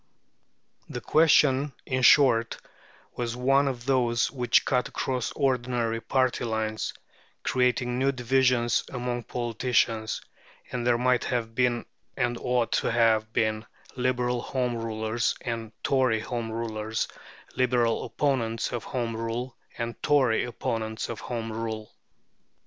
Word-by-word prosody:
The - - -4
question, 145 -3 +4
in 130 -1 -1
short, 125 -4 +5 0.6
was 120 -1 -3
one 135 +3 +3
of 120 -3 -3
those 120 -3 +2
which 125 -3 +2
cut 125 -1 +1
across 125 -3 -2
ordinary 120 -4 0
party 130 +2 +1
lines, 110 -1 -2 0.5
creating 125 -1 +1
new 135 +1 +3
divisions 125 -2 +2
among 120 -2 -3
politicians; 115 -2 0 0.5
and 125 -1 -2
there 120 -1 +4
might 125 0 +2
have 115 -3 -2
been 120 0 +1 0.3
and 120 0 +1
ought 125 -2 0
to - - 0
have 110 -2 +3
been 110 -1 0 0.3
Liberal 125 -1 0
Home 125 -1 -1
Rulers 115 0 -1
and 115 -3 -4
Tory 130 -5 +2
Home 115 -1 -4
Rulers, 110 -1 -2 0.5
Liberal 120 -2 +2
opponents 115 -6 -1
of 120 -3 -3
Home 120 -3 -2
Rule 115 +2 -4 0.2
and 115 -1 -4
Tory 130 -7 +3
opponents 115 -2 -3
of 115 - -5
Home 115 -2 -4
Rule. 110 -1 -5
120 Hz, 125 wpm, -27 LUFS, 115-125 Hz, 0.6 s, short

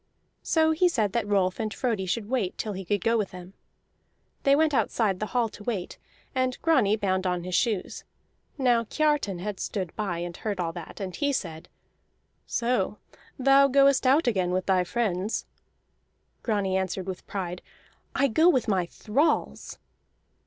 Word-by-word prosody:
So 320 -1 +2
he 355 +3 +3
said 215 - 0
that 235 -3 0
Rolf 190 -3 +1
and 215 -1 -2
Frodi 215 -7 -2
should 205 +3 -2
wait 225 -7 -1
till 215 - -3
he 190 0 -5
could 200 +1 -1
go 230 0 +2
with 205 - -1
them. 180 +1 -11 0.9
They 275 0 +4
went 310 0 +2
outside 215 -7 +1
the 215 - -2
hall 240 0 +1
to 210 - -12
wait, 205 -6 -4 0.3
and 255 -1 0
Grani 255 -11 +4
bound 190 -3 0
on 180 -1 -1
his 180 0 -5
shoes. 215 -2 0 0.5
Now 245 -4 +2
Kiartan 295 - 0
had 205 0 -4
stood 185 -5 -4
by 200 -6 -2
and 175 0 -5
heard 205 -3 -3
all 165 -2 -1
that, 175 +3 -9
and 190 -3 -5
he 285 -1 0
said: 165 - -4 0.8
"So 235 -4 0 0.4
thou 275 +1 +5
goest 275 -1 +4
out 280 +5 +4
again 190 -7 +1
with 185 +1 -1
thy 185 -2 +3
friends?" 200 0 -1 1.0
Grani 200 -4 0
answered 190 0 -2
with 190 -1 -7
pride: 180 -3 -4 0.5
"I 275 - +3
go 315 +8 +4
with 260 -8 +2
my 185 -4 +1
thralls!" 275 - -1
210 Hz, 165 wpm, -27 LUFS, 185-255 Hz, 1.0 s, thou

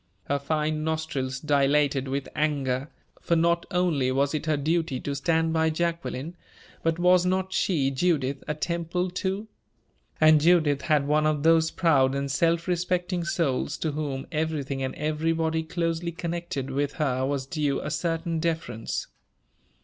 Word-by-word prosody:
Her 140 +6 -1
fine 155 +2 -1
nostrils 155 -4 -2
dilated 140 -1 +2
with 135 0 -2
anger 140 -3 0 0.3
for 170 - +1
not 170 +1 +2
only 175 -9 +1
was 140 +2 +1
it 155 0 -3
her 155 -1 +2
duty 160 -1 0
to 140 - -3
stand 165 +2 +1
by 160 0 +2
Jacqueline, 165 -2 -3 0.5
but 165 0 0
was 180 0 +4
not 190 +1 0
she, 140 -8 +1
Judith, 140 -2 0
a 150 - -1
Temple, 170 +3 -2
too? 190 +3 -2 0.7
And 155 -1 +6
Judith 155 -4 +4
had 150 -3 +2
one 150 +1 +3
of 150 -2 0
those 160 0 +4
proud 140 -7 +3
and 140 0 -2
self 165 +5 +1
respecting 180 0 0
souls 165 -6 -1
to 160 - -2
whom 145 -3 -3
everything 150 -4 -2
and 130 0 -3
everybody 160 +1 0
closely 165 +1 -2
connected 170 -6 -4
with 140 +1 -1
her 130 -4 0
was 135 0 -1
due 145 -1 -1
a - - -4
certain 165 +1 -1
deference. 160 -9 -2
155 Hz, 150 wpm, -26 LUFS, 140-170 Hz, 0.7 s, And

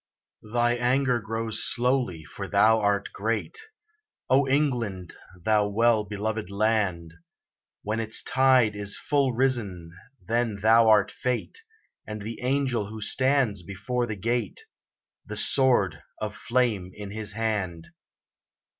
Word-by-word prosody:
Thy 120 0 +3
anger 125 0 +2
grows 115 +1 -2
slowly, 125 -9 0
for 100 +4 -7
thou 110 +3 +4
art 100 -1 0
great, 115 - -2 0.7
O 135 +1 +4
England! 120 - -1 0.3
thou 105 -1 +3
well 110 +1 +2
beloved 105 0 -3
land; 100 -5 0 0.7
When 110 +2 -2
its 110 0 0
tide 130 -5 +3
is 100 0 -1
full 140 -3 +1
risen, 110 -10 -1 0.3
then 115 -1 -1
thou 110 +2 +5
art 105 -2 +4
Fate, 125 - -3 0.5
And 105 -1 -6
the 115 +2 -6
angel 125 -4 0
who 110 0 -8
stands 130 -3 +1
before 100 +7 -3
the 110 - -4
gate, 115 +2 -2 0.7
The 105 - -6
sword 105 - +2 0.2
of 105 -1 -4
flame 115 -6 0
in 105 -1 -8
his 105 -1 -5
hand! 100 -7 -2
110 Hz, 125 wpm, -26 LUFS, 100-125 Hz, 0.7 s, thou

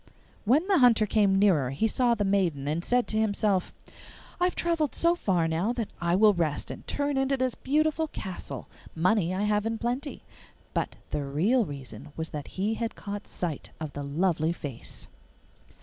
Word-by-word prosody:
When 290 - +3
the 390 -5 +4
Hunter 235 -4 +5
came 205 -2 +3
nearer 180 -10 +4
he 135 - +1
saw 240 +1 +2
the 210 - -1
maiden, 175 -8 +1
and 160 +3 -1
said 245 +3 +2
to 215 - 0
himself, 205 -3 +1 0.7
'I 355 - +3
have 360 - 0
travelled 330 -4 0
so 335 0 +4
far 185 - +1
now 170 +8 0
that 230 -4 -4
I 170 0 +2
will 210 +2 +6
rest, 165 -5 -1
and - - -9
turn 285 -1 0
into 270 0 +1
this 255 -1 0
beautiful 310 +3 +1
castle; 190 - -6 0.3
money 180 +2 +2
I 190 +2 -1
have 210 +1 +1
in 225 0 -2
plenty.' 250 +6 -3 0.5
But - - -1 0.2
the 145 - -1
real 190 - +2
reason 140 - -9
was 160 0 -4
that 150 -2 -5
he 205 +4 +1
had 230 0 -3
caught 205 0 -6
sight 165 -5 -4
of 155 -2 -5
the 145 - -5
lovely 160 +3 +1
face. 140 -8 -8
205 Hz, 180 wpm, -28 LUFS, 165-245 Hz, 0.7 s, will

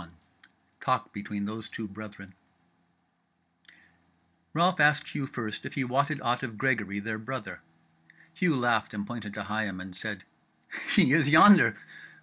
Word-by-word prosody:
CHAPTER 85 0 -16 0.3
21 - - -26 0.3
Talk - - -1
Between 100 0 -5
Those 110 +1 -6
Two 110 - -6
Brethren 100 -1 -11 2.2
Ralph 175 +2 +2
asked 150 0 +4
Hugh 135 - -4
first 115 -6 -6
if - - -8
he 140 - 0
wotted 140 +4 0
aught 120 +1 0
of 115 -5 -6
Gregory 110 -7 0
their 110 +1 -4
brother. 130 +4 -7 0.7
Hugh 165 -2 +1
laughed 120 -3 0
and 100 -1 -4
pointed 110 -3 -7
to 105 - -4
Higham, 105 -2 -3
and 90 0 -9
said: 100 -1 -6 0.7
"He 130 - +5
is 155 -2 +4
yonder." 170 +5 +8
110 Hz, 145 wpm, -28 LUFS, 105-135 Hz, 2.2 s, yonder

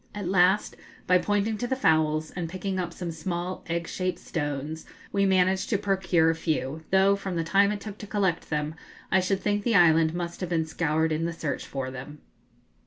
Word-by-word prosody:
At 205 -3 -4
last, 190 +2 +3 0.3
by 180 0 +4
pointing 205 +2 0
to 245 - -1
the 260 - 0
fowls 155 -7 +2
and 170 -2 -4
picking 185 +1 -3
up 175 -2 -2
some 170 0 -5
small 175 +3 -4
egg 170 0 -2
shaped 185 -1 -2
stones, 145 0 -4 0.3
we 200 0 +2
managed 190 +1 +2
to 215 - +2
procure 190 -5 +2
a - - -3
few, 160 -1 -2
though, 195 +1 +4
from 195 -2 -5
the 165 - 0
time 200 +4 +3
it 205 -1 -4
took 210 -1 -8
to 210 - -8
collect 195 -5 0
them, 150 0 -1 0.4
I 190 - +5
should 190 +1 0
think 205 0 0
the 230 -1 +1
island 165 -2 +5
must 175 -1 -4
have 180 - -3
been 165 -2 +1
scoured 160 0 0
in 155 +1 0
the 170 - -2
search 150 -4 -4
for 130 -1 -4
them. 135 +3 -9
175 Hz, 205 wpm, -27 LUFS, 160-195 Hz, 0.4 s, I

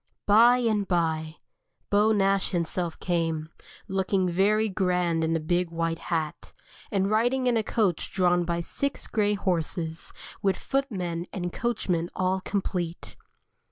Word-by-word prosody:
By 230 +4 +6
and 215 -5 0
by 160 -3 0 0.6
Beau 210 +2 +4
Nash 195 -2 +2
himself 170 -1 -2
came, 165 -3 -1 0.4
looking 190 -1 0
very 205 +5 +2
grand 180 -4 0
in 160 +1 +1
a - - +1
big 175 +2 0
white 165 0 -2
hat, 160 -3 -3 0.4
and 195 -2 +1
riding 245 +5 +2
in 245 -1 +3
a 225 - +3
coach 205 -6 0
drawn 180 -2 +2
by 170 0 -1
six 280 +10 -2
grey 210 -2 +1
horses, 170 -4 -2 0.3
with 195 -2 +1
footmen 185 -11 -2
and 175 -2 -4
coachmen 180 -8 -1
all 185 +1 +1
complete. 180 -4 -3
185 Hz, 135 wpm, -27 LUFS, 170-205 Hz, 0.6 s, By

